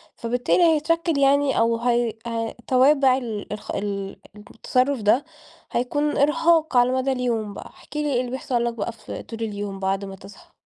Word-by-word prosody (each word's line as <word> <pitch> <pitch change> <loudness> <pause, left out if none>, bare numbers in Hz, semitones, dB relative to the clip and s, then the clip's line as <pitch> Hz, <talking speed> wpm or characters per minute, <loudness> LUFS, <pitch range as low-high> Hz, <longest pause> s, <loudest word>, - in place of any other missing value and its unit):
فبالتالي 245 +8 +1
هيتشكل 330 0 +2
يعني 280 0 +3
أو 230 0 +2
هي 240 -1 +1
هي 230 -1 -3
توابع 265 0 +4
ال 220 -5 -5
الخ 210 0 -7
ال 200 -1 -4 0.2
التصرف 250 +5 -1
ده، 225 +7 +3 0.5
هيكون 290 +5 0
إرهاق 310 0 +3
على 245 +1 +4
مدى 260 +1 0
اليوم 235 -5 -1
بقى، - - -9
احكِ - - -12
لي 300 -1 0
إيه 245 - +2
اللي 250 -1 -3
بيحصل 255 -2 -1
لك 235 - -1
بقى 235 0 -3
في 225 -1 -9
طول 225 - -9
اليوم 205 -3 -4
بعد 195 +1 -1
ما 195 - -8
تصحى؟ 195 +1 -16
245 Hz, 175 wpm, -23 LUFS, 220-275 Hz, 0.5 s, توابع